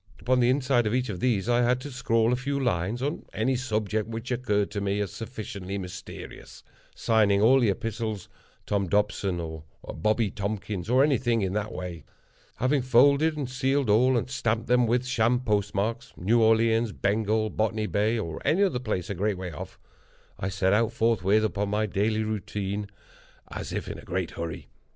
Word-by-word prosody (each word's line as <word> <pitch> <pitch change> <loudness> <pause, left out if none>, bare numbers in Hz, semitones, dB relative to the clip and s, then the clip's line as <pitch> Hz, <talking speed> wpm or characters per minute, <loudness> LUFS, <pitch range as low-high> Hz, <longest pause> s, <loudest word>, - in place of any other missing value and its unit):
Upon 130 +1 +2
the 120 0 +4
inside 130 -3 +2
of 110 - 0
each 125 -1 0
of 95 -4 -4
these 110 -3 +1
I 120 0 +3
had 125 +1 +2
to 145 +2 -7
scrawl 115 -2 +1
a - - +3
few 140 +2 -2
lines 115 -1 -1
on 145 +3 -2
any 130 +4 +1
subject 110 -4 -1
which 115 +3 -5
occurred 105 -5 0
to 100 -1 -3
me 100 0 0
as 100 -4 -2
sufficiently 100 -4 -6
mysterious—signing 100 +2 -2
all 125 +6 +6
the 120 -4 +3
epistles 110 0 -3 0.4
Tom 100 -2 0
Dobson, 100 -2 0
or 80 -2 -6 0.3
Bobby 110 +4 +1
Tompkins, 100 -1 -4
or 130 +2 +5
anything 125 -6 +2
in 95 -1 -1
that 105 0 -2
way. 90 -2 -6 0.5
Having 130 +3 +1
folded 140 +5 +4
and 140 -4 -2
sealed 130 -1 0
all, 125 +4 +4
and 115 - -1
stamped 115 -3 -1
them 125 0 +3
with 120 +2 +1
sham 125 -1 +2
postmarks—New 105 0 0
Orleans, 115 0 +3
Bengal, 110 +1 0
Botany 110 0 0
Bay, 105 +2 +1
or 80 -7 -4
any 185 +6 +3
other 160 -11 +1
place 105 -7 -3
a - - 0
great 100 +1 -1
way 90 -1 -5
off—I 80 +4 -10
set 95 0 +1
out, 115 +1 +2
forthwith, 110 -2 +2
upon 105 -1 -1
my 105 +1 +1
daily 110 +2 0
route, 110 -2 -4 1.0
as - - -5
if - - -3
in - - -5
a - - -10
very - - -16
great 90 -1 -2
hurry. 85 -2 -6
110 Hz, 180 wpm, -27 LUFS, 100-125 Hz, 1.0 s, all